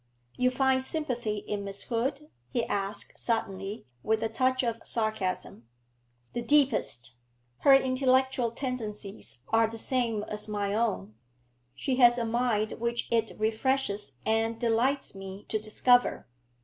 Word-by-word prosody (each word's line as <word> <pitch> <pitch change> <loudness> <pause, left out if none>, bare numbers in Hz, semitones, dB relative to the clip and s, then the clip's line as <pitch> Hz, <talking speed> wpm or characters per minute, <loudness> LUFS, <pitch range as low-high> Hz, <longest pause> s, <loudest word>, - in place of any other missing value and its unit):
'You 250 0 +3
find 260 0 +2
sympathy 250 -7 -2
in 205 -1 -2
Miss 200 0 -4
Hood?' 265 +5 -2 0.2
he 235 -1 0
asked 200 +1 -2
suddenly, 200 -2 -2 0.2
with 220 - 0
a 225 - 0
touch 255 +3 +1
of 230 -1 -1
sarcasm. 215 - -1 0.7
'The 240 - -2
deepest. 235 - +2 0.5
Her 275 -1 +7
intellectual 260 -1 +2
tendencies 210 - -5
are 225 0 +4
the 225 +1 -7
same 230 -3 0
as 210 0 -5
my 205 -1 -1
own; 205 - -1 0.6
she 260 -2 -1
has 240 -1 +7
a 235 - 0
mind 225 -2 +1
which 235 +1 -2
it 225 -1 +1
refreshes 220 - 0
and 225 +1 +1
delights 245 +4 +1
me 195 0 -9
to 215 - 0
discover. 245 +3 +3
230 Hz, 135 wpm, -29 LUFS, 210-255 Hz, 0.7 s, Her